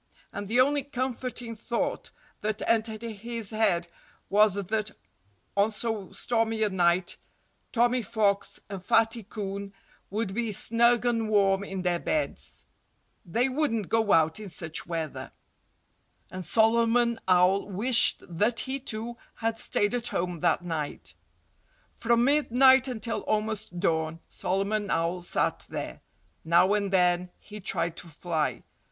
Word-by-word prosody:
And 205 0 -5
the 235 +5 +1
only 285 +2 +2
comforting 255 -3 -4
thought 235 +2 -3 0.3
that 215 0 -2
entered 220 -1 0
his 230 0 -4
head 215 -6 +1 0.4
was 210 -1 +5
that 210 +2 -2 0.7
on 200 +2 +2
so 215 -3 -4
stormy 225 -2 -1
a 210 - +2
night 175 -1 +1 0.5
Tommy 245 +1 +2
Fox 205 -2 0
and 195 -2 -7
Fatty 225 +3 +2
Coon 200 -1 -6 0.4
would 205 -1 -3
be 230 0 -2
snug 235 +3 +4
and 230 -2 0
warm 195 -2 +3
in 195 -2 -5
their 175 -1 0
beds. 305 - -3 0.6
They 235 +9 +1
wouldn't 255 - -1
go 225 -2 +1
out 160 +3 +3
in 210 -2 -8
such 160 -1 -1
weather. 165 -3 -5 1.0
And 185 0 -6
Solomon 230 +4 +2
Owl 185 +2 +3
wished 225 +6 +6
that 210 +7 +1
he, 270 +1 -3
too, 235 -2 -2 0.2
had 225 0 -2
stayed 205 +3 +1
at 240 -1 -1
home 175 -1 -2
that 175 +1 +1
night. 160 -4 -5 0.8
From 235 0 +2
midnight 265 -2 +4
until 230 -2 -3
almost 215 -4 -2
dawn 160 -2 0
Solomon 200 +2 -1
Owl 170 +2 -1
sat 175 - -1
there. - - -6 0.4
Now 170 +4 +4
and 200 -2 0
then 180 -1 +2
he 210 0 -11
tried 170 -3 -1
to 175 - -8
fly. 160 -1 -3
215 Hz, 135 wpm, -27 LUFS, 185-230 Hz, 1.0 s, wished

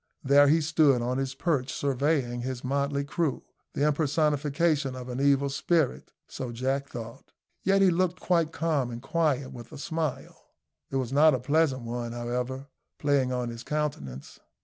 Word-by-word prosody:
There 140 +1 +6
he 160 +3 +4
stood 150 -5 +3
on 125 +2 -1
his 135 0 -3
perch 140 -6 0
surveying 135 -3 0
his 130 0 -4
motley 140 +1 0
crew 150 0 -2 0.3
the 145 - +1
impersonation 150 -1 +1
of 125 0 -7
an 125 +2 -3
evil 140 0 +3
spirit 140 +1 0 0.2
so 125 -2 -6
Jack 135 +4 -2
thought. 115 -1 -9 0.3
Yet 195 0 +3
he 190 - +5
looked 180 +1 0
quite 170 -3 +1
calm 155 -7 0
and 120 -1 -6
quiet, 140 -1 0
with 120 -2 -10
a - - -9
smile 160 -1 -4 0.5
it - - -5
was 130 -1 -1
not 150 0 +6
a - - -2
pleasant 140 -1 +1
one, 120 0 -4
however 125 +3 -3 0.3
playing 140 -3 +1
on 125 -1 -2
his 115 0 -7
countenance. 120 - -4
140 Hz, 165 wpm, -27 LUFS, 125-155 Hz, 0.5 s, There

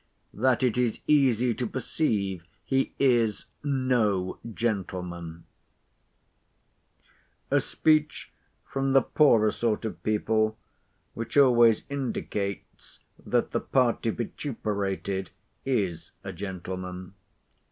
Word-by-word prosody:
—THAT 130 +2 +2
IT 125 -2 +2
IS 120 -3 0
EASY 125 -5 +3
TO 120 +1 -3
PERCEIVE 105 - -1 0.2
HE 135 0 0
IS 120 -6 +2 0.2
NO 125 -9 0
GENTLEMAN 90 -7 -3 2.1
A - - +4
speech 155 -1 +1 0.3
from 135 0 -1
the 135 -2 +6
poorer 115 -9 +4
sort 115 -1 -1
of 90 -6 -5
people, 110 +1 +1 0.6
which 115 +4 -4
always 120 -5 +5
indicates 105 -8 -4 0.2
that - - 0
the - - 0
party 120 -3 +1
vituperated 100 - -3 0.4
is 95 -11 -1
a 95 - -6
gentleman. 90 0 -6
110 Hz, 95 wpm, -27 LUFS, 95-130 Hz, 2.1 s, the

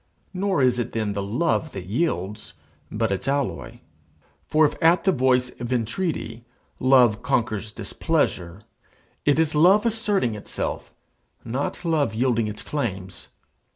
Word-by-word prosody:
Nor 190 -5 +1
is 125 -1 +3
it 120 - -3
then 110 -2 -1
the 100 - -2
love 140 +10 -1
that 95 -2 -6
yields, 105 - -2 0.4
but 110 -1 -1
its 95 - -2
alloy. 140 -1 -2 0.6
For 155 0 +3
if - - +1
at 165 +2 +4
the 190 - +4
voice 125 -3 +2
of 120 +1 -4
entreaty 120 - -2 0.4
love 125 -4 +4
conquers 110 -5 -1
displeasure, 90 -2 -2 0.6
it 145 0 +4
is 160 -1 +2
love 185 +8 +5
asserting 210 - +1
itself, 105 - -4 0.5
not 130 +8 -3
love 150 -9 +1
yielding 115 -2 +1
its 105 0 -6
claims. 95 -10 -4
125 Hz, 135 wpm, -24 LUFS, 110-155 Hz, 0.6 s, love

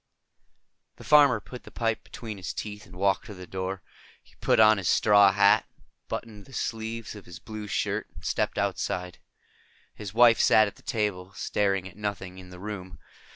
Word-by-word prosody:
The - - -13
farmer 145 -6 +6
put 125 +3 -10
the - - -12
pipe 115 -1 -2
between 110 -3 -8
his 90 -2 -5
teeth 105 0 -7
and 90 - -14
walked 95 +3 +1
to 105 - -8
the 90 0 -9
door. 95 0 -5 0.4
He - - -24
put - - +3
on 110 -1 +6
his 95 - -1
straw 100 -2 +6
hat, - - +4 0.4
buttoned 105 -3 -6
the 135 - -15
sleeves 115 -2 -4
of 105 -3 -12
his 85 - -9
blue 110 -1 -8
shirt 100 - -1
and - - -12
stepped - - -1
outside. 90 -1 -2 0.7
His 105 -3 -8
wife 115 +1 +6
sat 110 - +6
at 100 - -6
the - - -18
table, 105 -7 -2
staring 95 -2 0
at 95 - -14
nothing 95 -3 -5
in 90 -1 -12
the 90 - -11
room. 95 -2 -7
105 Hz, 185 wpm, -27 LUFS, 95-110 Hz, 0.7 s, farmer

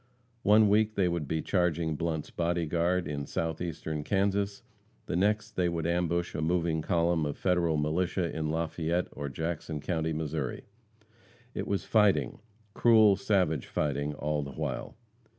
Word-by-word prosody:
One 105 0 +6
week 105 +1 +3
they 95 -2 +2
would 85 -4 -2
be 80 +1 -1
charging 85 -4 +1
Blunt's 80 -1 -3
Body 85 0 0
Guard 85 +3 0
in 70 -1 -4
Southeastern 80 -2 -3
Kansas; 100 +2 0 0.4
the - - -3
next 105 +4 +1
they 90 -4 0
would 85 -2 -2
ambush 85 0 0
a - - -3
moving 85 -1 +1
column 85 0 +1
of 75 -1 -3
Federal 85 -4 +1
militia 85 +3 0
in 80 -1 -2
Lafayette, 85 +2 -1
or 70 -1 -5
Jackson 80 +1 -4
county, 80 0 -1
Missouri. 75 -4 -3 0.9
It - - -4
was 100 -4 -1
fighting 100 - +2 0.3
cruel, 110 -4 +6
savage 90 - +1
fighting, 75 0 -1
all 75 +1 -1
the 70 -1 -6
while. - - -4
85 Hz, 150 wpm, -29 LUFS, 75-90 Hz, 0.9 s, One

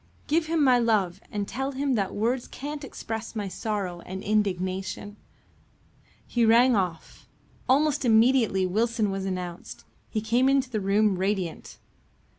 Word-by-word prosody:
Give 315 +1 +1
him 320 -2 +1
my 255 -3 +5
love 200 -6 +1
and 205 -1 -3
tell 270 +2 -3
him 275 0 0
that 200 -5 -1
words 235 +4 0
can't 290 +2 -6
express 225 -4 -6
my 205 -2 -2
sorrow 190 -3 -3
and 190 +1 -7
indignation." 195 -1 -1 1.1
He 240 - 0
rang 235 +2 +5
off. 180 -5 -3 0.4
Almost 285 +2 +3
immediately 225 -4 +4
Wilson 220 +2 0
was 195 0 -3
announced. 180 -2 -6 0.2
He 220 - -1
came 235 +5 +2
into 270 -1 +1
the 215 -3 -1
room 200 0 +2
radiant. 190 -3 -3
215 Hz, 140 wpm, -26 LUFS, 190-255 Hz, 1.1 s, my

